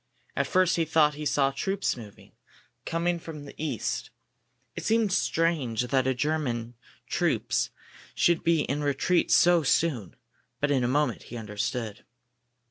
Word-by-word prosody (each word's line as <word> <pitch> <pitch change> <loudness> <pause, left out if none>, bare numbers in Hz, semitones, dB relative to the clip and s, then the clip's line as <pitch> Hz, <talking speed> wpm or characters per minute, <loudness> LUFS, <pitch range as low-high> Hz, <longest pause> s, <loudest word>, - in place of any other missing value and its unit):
At - - 0
first 185 -2 +3
he 165 - +3
thought 155 -1 +3
he 150 +1 -3
saw 135 -1 +2
troops 195 +7 -1
moving, 110 -5 -12 0.6
coming 170 +1 0
from 155 -3 -8
the 140 - -10
east. 155 - -2 0.7
It - - -5
seemed 220 -3 +2
strange 155 - +1
that 130 0 +1
German 125 -6 -1 0.3
troops - - 0 0.5
should 170 -1 +2
be 165 -2 +3
in 145 +1 -2
retreat 145 +5 +1
so 175 -1 +5
soon, 135 - 0 0.4
but 145 +1 +1
in 130 -3 +2
a - - +2
moment 140 -1 +1
he 120 - -6
understood. 110 0 -4
145 Hz, 140 wpm, -27 LUFS, 125-165 Hz, 0.7 s, so